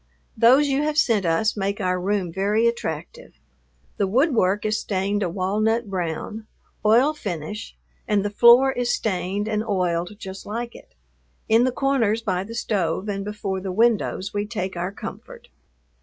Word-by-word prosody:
Those 255 +6 +5
you 275 0 +1
have 300 0 -1
sent 220 - +3
us 190 +7 +1
make 200 0 -2
our 180 -2 0
room 190 -3 -1
very 205 +4 +1
attractive. 480 - -4 0.6
The 200 - +1
woodwork 215 - +2
is 215 0 +1
stained 200 +1 -1
a 180 - 0
walnut 210 +5 0
brown, 190 +5 -4 0.4
oil 240 +8 +4
finish, 205 - -6 0.3
and 205 -2 +1
the 205 - -1
floor 240 +5 +6
is 245 -1 -1
stained 200 -1 -1
and 215 -1 -1
oiled 180 -2 -1
just 190 -2 -8
like 235 +3 -4
it. - - -16 0.5
In 230 +2 +4
the 255 - +1
corners 240 -5 +1
by 185 -3 -1
the 225 +3 -9
stove 195 -5 -1
and 195 -1 -2
before 200 -2 -4
the 190 0 -4
windows 220 -2 +1
we 205 0 -2
take 190 -4 -4
our 175 +2 -3
comfort. - - -9
210 Hz, 160 wpm, -23 LUFS, 190-235 Hz, 0.6 s, floor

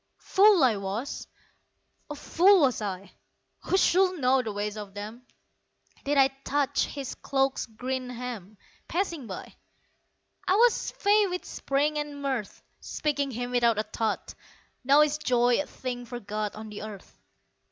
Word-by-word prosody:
Fool 395 -4 +5
I 235 -5 +4
was 200 +8 -4 0.8
oh, 295 - -5
fool 365 +6 +4
was 255 -5 +2
I 195 -1 -5 0.5
(Who 380 - +2
should 370 -1 +3
know 260 0 +3
the 225 -3 -4
ways 205 +1 -3
of 205 -2 -8
them!) 220 +4 -8 0.8
That 285 +1 +1
I 270 -1 +6
touched 285 -1 +1
his 275 -3 -6
cloak's 270 -1 -1
green 255 +3 -4
hem, 235 -5 -7 0.3
Passing 335 - -2
by. - - -8 0.9
I 370 - +4
was 470 +2 +3
fey 410 0 +3
with 360 -1 -4
spring 295 +2 -1
and 295 -1 -5
mirth 265 -7 -3 0.2
Speaking 285 -2 -2
him 245 0 -4
without 235 -3 +3
a 215 - +1
thought 215 0 -3 0.5
Now 280 +3 +6
is 300 0 +2
joy 245 -3 +3
a 290 - -7
thing 245 -1 -6
forgot 215 -3 -4
On 215 0 -8
the 210 - -8
earth. 210 -3 -10
255 Hz, 150 wpm, -27 LUFS, 220-295 Hz, 0.9 s, I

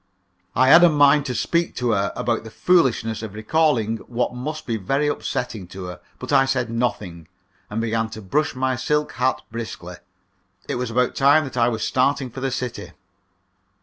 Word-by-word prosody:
I 130 +1 +4
had 170 +4 +8
a 175 - +8
mind 145 -1 +4
to 125 - -3
speak 170 +6 0
to 125 -2 0
her 100 -2 0
about 115 -1 -1
the 110 - -9
foolishness 120 - +1
of 105 -2 -7
recalling 115 -1 +1
what 125 0 -1
must 150 +5 -5
be 115 - -2
very 135 +9 0
upsetting 110 -8 -3
to 95 +1 -9
her. 90 0 -8 0.2
But - - -5
I 135 - +5
said 130 -3 -1
nothing, 100 -8 -3 0.4
and 105 - -3
began 115 0 -1
to - - -8
brush 150 +10 0
my 130 0 0
silk 150 +4 -1
hat 130 +1 -1
briskly. 110 -6 -7 0.7
It - - -2
was 125 - -2
about 125 +2 +1
time 140 +3 +5
that 135 -4 -7
I 120 -1 +3
was 115 -2 -3
starting 130 0 +1
for 135 - -8
the 135 0 -1
city. 125 -1 -5
125 Hz, 185 wpm, -22 LUFS, 110-140 Hz, 0.7 s, had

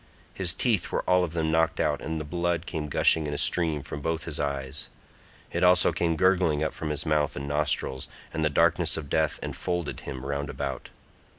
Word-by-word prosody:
His 90 -3 +1
teeth 105 -1 0
were - - 0
all 90 0 +4
of 85 -2 -3
them 80 -1 0
knocked 80 0 +2
out - - +1
and 80 0 -3
the 75 - -5
blood 85 +1 -1
came 75 -4 -4
gushing 80 +2 +3
in 75 - -3
a - - -2
stream 80 -3 +2
from 75 - -6
both 80 +1 -2
his 80 -3 -3
eyes; 70 0 -3 0.6
it - - -1
also 90 -1 +5
came 85 0 0
gurgling 90 -3 +3
up 80 - -1
from 80 - -4
his 75 +1 -2
mouth 75 -2 +1
and 70 0 -5
nostrils, 70 -3 0 0.3
and 80 - -1
the 75 - +3
darkness 70 - +3
of 75 -3 -7
death 80 -1 +1
enfolded 85 -4 -3
him 65 0 -7
round 70 +1 -2
about. 65 -3 -4
80 Hz, 205 wpm, -27 LUFS, 75-85 Hz, 0.6 s, also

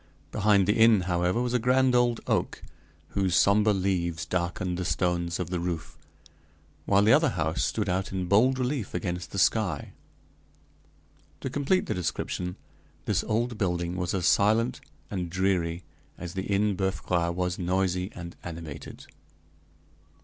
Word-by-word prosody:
Behind 105 -2 +3
the 105 - +3
inn, 110 -3 +6
however, 90 +5 0
was 125 0 -2
a 125 - +3
grand 130 +2 +3
old 120 -1 +2
oak, - - -1 0.5
whose 95 -2 0
somber 105 +2 +4
leaves 90 -4 -1
darkened 90 0 -2
the - - -1
stones 85 -1 -1
of 90 -1 -4
the 90 - -1
roof, 80 -3 -4 0.9
while 100 0 +4
the 110 +2 +6
other 160 +3 +4
house 80 -1 -1
stood 105 -2 -1
out 95 +1 -1
in 95 -2 -2
bold 115 +8 +4
relief 125 -5 -2
against 90 -1 -3
the - - -7
sky. - - +1 1.5
To 130 - -4
complete 145 +8 +1
the - - -2
description, 90 0 -3 0.5
this - - +1
old 115 0 -1
building 90 -2 -1
was 90 0 -2
as 90 -3 -1
silent 115 +5 +3 0.3
and 90 -4 -3
dreary 90 -2 0 0.3
as 90 -1 -7
the 95 0 -4
Inn 100 0 +1
Boeuf 95 0 -2
Gras 85 -1 +1
was 90 0 -2
noisy 90 +1 0
and 85 -1 -8
animated. 80 -4 -8
95 Hz, 150 wpm, -27 LUFS, 85-105 Hz, 1.5 s, inn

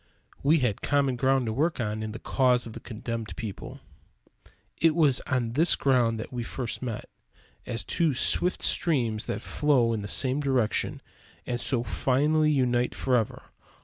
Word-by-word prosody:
We 150 +4 +4
had 115 -5 0
common 140 -2 +1
ground 130 +1 +1
to 110 - -2
work 155 +6 0
on 110 -2 -2
in 110 0 -4
the 110 - -6
cause 125 0 +1
of 115 - -8
the - - -8
condemned 115 -1 -6
people. 110 -4 -7 1.0
It 160 -1 +3
was 150 -6 +4
on 125 -4 0
this 160 +6 +3
ground 120 -4 +2
that 110 - -7
we 120 - -3
first 120 0 -5
met; 120 -5 -5 0.6
as 115 -1 -2
two 160 -5 0
swift 180 +7 +2
streams 120 -10 +1
that 105 - -4
flow 130 -6 +2
in 110 - -2
the 100 - -6
same 130 +5 +2
direction 130 -6 0 0.4
and 120 0 -3
so 120 -4 0
finally 150 +7 +1
unite 125 -4 +1
forever. 125 -5 0
125 Hz, 165 wpm, -27 LUFS, 115-140 Hz, 1.0 s, We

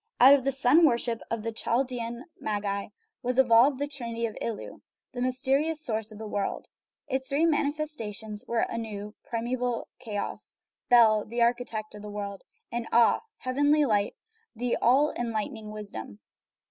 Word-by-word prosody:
Out 265 +3 +9
of 280 -2 +4
the 275 - +1
sun 270 +5 +5
worship 235 -5 +2
of 230 -2 -2
the 230 - -2
Chaldean 240 +1 -1
magi 200 -1 -2 0.3
was 250 0 -1
evolved 255 +2 +6
the 285 +2 -2
Trinity 235 -5 -4
of 220 - -4
Ilu, 230 -3 -5 0.3
the 245 -3 -5
mysterious 270 +5 +1
source 220 -7 -2
of 215 - -10
the 220 - -7
world; 205 -1 -3 0.4
its 265 0 -2
three 290 +4 +2
manifestations 285 -9 -2
were 235 -1 +1
Anu, 210 -2 -5
primeval 240 +1 -2
chaos; 210 -5 -5 0.3
Bel, 220 -3 +6
the 235 +2 0
architect 235 -3 -1
of 210 - -9
the 210 - -7
world; 200 -1 -5 0.3
and 235 -1 -3
Aa, 235 0 +5
the - - -15 0.2
heavenly 290 +3 +3
light, 205 -4 +1 0.4
the 245 +1 0
all 270 +5 +4
enlightening 225 -1 -3
wisdom. 200 - -8
235 Hz, 155 wpm, -28 LUFS, 215-265 Hz, 0.4 s, Out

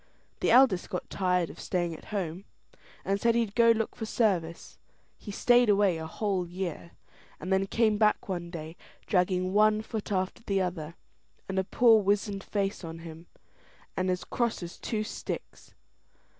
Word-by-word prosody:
The - - +1
eldest 240 -7 +5
got 180 - -5
tired 180 -3 0
of - - -15
staying 175 -2 -1
at 160 - -11
home, 190 -2 -4 0.6
and 200 +1 0
said 235 -1 +3
he'd 230 -4 0
go 230 0 +5
look 225 -1 +1
for 220 - -5
service. 180 -8 -1 0.4
He - - -10
stayed 245 +3 +4
away 200 -4 +3
a 160 - -5
whole 190 0 -2
year, 175 -1 -5 0.5
and 185 +1 -2
then 190 0 +2
came 215 -1 +2
back 215 -1 +2
one 175 -3 -4
day, 160 -1 -8 0.3
dragging 185 -1 +1
one 215 +1 +4
foot 220 -1 -5
after 185 +1 -1
the 200 -4 0
other, 170 -3 -3 0.5
and 190 0 -1
a - - +1
poor 225 +2 +5
wizened 200 0 0
face 200 -2 -2
on 165 0 -6
him, 165 +1 -10 0.7
and 185 0 0
he - - +3
as 180 - -5
cross 235 -6 -1
as 175 - -8
two 215 -2 -2
sticks. 215 - -7
195 Hz, 170 wpm, -28 LUFS, 180-215 Hz, 0.7 s, eldest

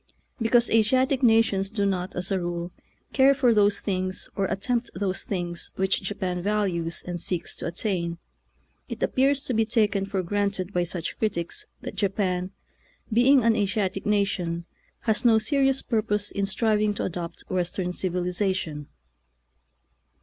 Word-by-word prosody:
Because 235 +1 +3
Asiatic 255 +4 +3
nations 225 -5 +3
do 205 -1 -1
not, 185 -1 -1
as 180 +2 -2
a 190 - +2
rule, 175 0 -3 0.4
care 275 0 +5
for 255 -3 +4
those 205 -1 +3
things 185 -1 -2
or 195 - +1
attempt 230 +6 -1
those 190 0 -2
things 175 -3 -3
which 190 0 +1
Japan 185 -2 -3
values 180 -5 -1
and 175 -1 -4
seeks 175 -2 -2
to - - -2
attain, 170 -1 -2 0.7
it - - -4
appears 275 +1 +2
to 255 - -2
be 225 0 +3
taken 215 -3 +1
for 195 -2 -1
granted 200 0 -1
by 175 -1 +1
such 175 -1 -4
critics 170 -6 -2
that - - -6
Japan, 190 -2 0 0.6
being 250 +3 +5
an 230 -1 +4
Asiatic 195 -1 -1
nation, 180 -5 0 0.4
has 220 -2 0
no 230 -2 +6
serious 270 +4 +2
purpose 210 -3 0
in 200 -1 -1
striving 210 0 +1
to - - -2
adopt 170 -1 -5
Western 180 0 -1
civilization. 180 -4 -2
200 Hz, 145 wpm, -26 LUFS, 180-220 Hz, 0.7 s, no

